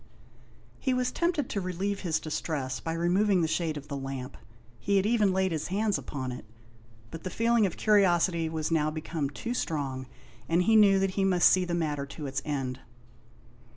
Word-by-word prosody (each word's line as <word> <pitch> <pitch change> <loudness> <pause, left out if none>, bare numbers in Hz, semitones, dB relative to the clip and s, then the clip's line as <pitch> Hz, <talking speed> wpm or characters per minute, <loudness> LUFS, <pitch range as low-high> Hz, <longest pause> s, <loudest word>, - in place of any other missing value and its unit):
He 260 -1 0
was 250 0 0
tempted 340 -6 0
to 200 - -2
relieve 190 +2 -2
his 160 -4 0
distress 145 -4 -3
by 165 - -3
removing 180 +3 +2
the - - +2
shade 160 -1 -1
of 145 0 -9
the 140 - -5
lamp; 135 -2 -5 0.4
he 200 - 0
had 195 - +2
even 215 -3 +3
laid 190 0 +1
his 155 -2 -2
hand 205 +2 0
upon 130 -7 -4
it, 125 - -7 0.7
but 165 - -8
the 185 - -3
feeling 230 0 +2
of 175 - -7
curiosity 175 -5 +3
was 160 0 -3
now 155 -2 +2
become 155 -2 -3
too 230 - -4
strong, 135 - -3 0.4
and 170 +2 +3
he 220 +4 +3
knew 205 -2 +6
that 195 0 +1
he 195 +1 -1
must 185 -2 +5
see 185 -1 +3
the 175 -1 -2
matter 150 -4 -2
to 145 +1 -8
its 135 0 -3
end. 135 -3 -3
170 Hz, 190 wpm, -28 LUFS, 150-195 Hz, 0.7 s, knew